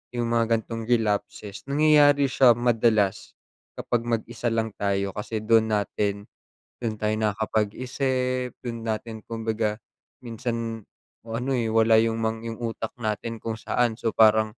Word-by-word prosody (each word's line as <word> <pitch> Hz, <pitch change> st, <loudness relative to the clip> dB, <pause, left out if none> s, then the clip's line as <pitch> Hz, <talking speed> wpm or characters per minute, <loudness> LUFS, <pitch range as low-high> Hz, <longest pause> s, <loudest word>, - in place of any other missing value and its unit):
yung 120 Hz, -1 st, 0 dB
mga 115 Hz, -1 st, +3 dB
gan'tong 115 Hz, 0 st, -6 dB
relapses 105 Hz, -3 st, -1 dB
nangyayari 145 Hz, 0 st, +5 dB
siya 125 Hz, -3 st, +6 dB
madalas 110 Hz, -4 st, +1 dB, 0.4 s
kapag 120 Hz, -1 st, -1 dB
mag-isa 115 Hz, +1 st, -2 dB
lang 115 Hz, -1 st, -1 dB
tayo. 100 Hz, -1 st, 0 dB
Kasi 110 Hz, +1 st, -4 dB
dun 110 Hz, 0 st, +4 dB
natin, 100 Hz, -1 st, -1 dB, 0.6 s
dun 115 Hz, -3 st, -2 dB
tayo 105 Hz, 0 st, +1 dB
nakakapag-isip, 125 Hz, +4 st, -1 dB
dun 115 Hz, -2 st, -5 dB
natin 110 Hz, 0 st, -3 dB
kumbaga 110 Hz, -2 st, -2 dB, 0.5 s
minsan 115 Hz, -2 st, -4 dB, 0.4 s
ano 115 Hz, +4 st, -3 dB
eh, 120 Hz, -3 st, 0 dB
wala 110 Hz, 0 st, +5 dB
yung 115 Hz, 0 st, 0 dB, 0.2 s
yung 115 Hz, -1 st, -6 dB
utak 115 Hz, -1 st, -4 dB
natin 115 Hz, 0 st, -3 dB
kung 115 Hz, +1 st, -4 dB
saan 115 Hz, +1 st, 0 dB
so 115 Hz, 0 st, -2 dB
parang 110 Hz, 0 st, +4 dB
115 Hz, 130 wpm, -25 LUFS, 110-120 Hz, 0.6 s, siya